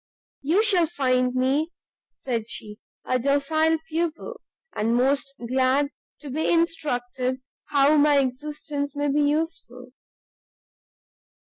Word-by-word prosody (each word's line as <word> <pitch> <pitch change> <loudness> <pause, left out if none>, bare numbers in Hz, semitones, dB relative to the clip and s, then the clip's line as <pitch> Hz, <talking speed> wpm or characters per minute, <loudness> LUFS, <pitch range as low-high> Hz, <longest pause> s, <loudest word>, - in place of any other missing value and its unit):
"You 335 +10 +2
shall 370 -6 +4
find 255 -5 0
me," 270 +5 +1 0.4
said 235 -4 -4
she, 210 -2 -7 0.3
"a 255 - +1
docile 285 +5 +2
pupil, 330 0 -3 0.3
and 225 +2 0
most 275 +2 +1
glad 260 +3 +2 0.3
to 290 -3 -7
be 310 +4 0
instructed 260 -6 -1 0.3
how 290 +1 +3
my 295 0 +5
existence 285 +2 -2
may 290 0 0
be 295 +1 +2
useful." 290 -5 -2
280 Hz, 110 wpm, -24 LUFS, 255-310 Hz, 0.4 s, my